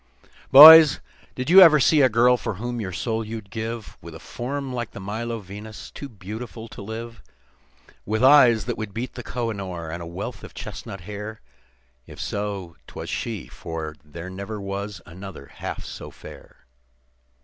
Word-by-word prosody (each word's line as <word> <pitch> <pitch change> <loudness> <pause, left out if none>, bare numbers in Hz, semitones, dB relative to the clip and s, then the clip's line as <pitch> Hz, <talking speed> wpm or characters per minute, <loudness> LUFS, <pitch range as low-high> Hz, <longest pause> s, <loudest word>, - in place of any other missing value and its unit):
"Boys, 155 +1 +11 0.4
did 130 - -4
you 190 +2 +10
ever 160 -4 +8
see 150 +3 +4
a 130 - +5
girl 120 +2 +4
for 110 -3 -4
whom 120 +3 -4
your 95 -3 -5
soul 110 +4 -2
you'd 110 -2 -8
give, 115 0 -6
With 85 0 -11
a - - -10
form 135 +2 -5
like 120 -2 -5
the - - -8
Milo 115 +4 -4
Venus, 105 +3 -10
too 140 - -9
beautiful 110 +2 -8
to - - -10
live; 115 +3 -8 0.8
With 110 +3 -2
eyes 130 -5 +6
that 120 -1 -4
would 110 -2 -6
beat 120 +2 -4
the 125 - -7
Koh 120 0 -3
i - - -3
noor, 90 -5 -6
and 85 +1 -6
a 85 - -7
wealth 90 +4 -7
of - - -12
chestnut 95 - -8
hair? 105 +3 -8 0.7
If - - -12
so, 100 -4 -5
'twas - - -7
she, 110 -7 -4
for 80 -2 -7
there 80 +5 -9
never 100 +3 -6
was 100 -1 -6
another 95 -2 -10
half - - -5
so - - -8
fair. - - -15
110 Hz, 175 wpm, -23 LUFS, 100-120 Hz, 0.8 s, Boys